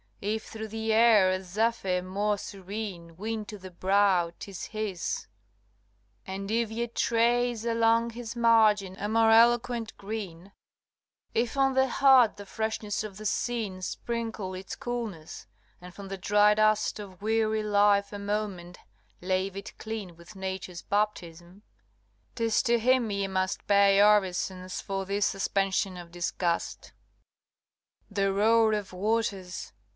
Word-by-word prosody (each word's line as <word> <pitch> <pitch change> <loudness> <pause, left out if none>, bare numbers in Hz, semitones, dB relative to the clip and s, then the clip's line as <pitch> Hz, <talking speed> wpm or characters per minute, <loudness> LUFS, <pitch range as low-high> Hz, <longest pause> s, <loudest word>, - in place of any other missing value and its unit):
If 215 +2 -3
through 220 0 -7
the 220 +1 -2
air 220 -4 +5
a 185 0 -1
zephyr 195 -1 0
more 205 +3 -1
serene 195 -4 -7
Win 220 +2 -3
to 210 +1 -8
the 185 -1 -11
brow, 185 -1 +2
'tis 195 -3 -7
his; 215 -5 -4 1.0
and 195 +1 -5
if 230 0 +1
ye 230 +2 -2
trace 235 0 +1
Along 230 0 +2
his 235 0 -7
margin 215 -5 +4
a 205 - -2
more 225 +1 +3
eloquent 235 0 +3
green, 195 -3 -7 0.8
If 235 +2 0
on 270 -1 +3
the 265 0 +3
heart 260 -4 +5
the 205 - -9
freshness 220 0 -3
of 205 -3 -8
the 215 - -9
scene 215 -5 -2
Sprinkle 225 -1 -4
its 185 +1 -7
coolness, 230 - -6 0.3
and 180 0 -12
from 200 0 -9
the 195 0 -5
dry 210 +2 +4
dust 215 0 +2
Of 195 -2 -10
weary 220 0 +1
life 205 -1 +3
a 205 - -5
moment 200 -4 -4 0.4
lave 185 +1 -1
it 200 +1 -8
clean 215 -6 -6
With 170 +5 -15
Nature's 190 -2 -5
baptism, 185 -2 -3 0.7
'tis 230 -2 +1
to 235 -2 +3
him 250 0 +2
ye 200 -1 -1
must 185 -1 -2
Pay 200 -1 +5
orisons 190 -2 +1
for 195 -1 -4
this 200 +1 +1
suspension 195 -1 -1
of 175 -1 -10
disgust. 175 0 -2 1.2
LXIX. 205 - -18
The 195 -1 +1
roar 220 +2 +4
of 205 -3 -3
waters! 195 -2 -2
205 Hz, 140 wpm, -28 LUFS, 190-225 Hz, 1.2 s, air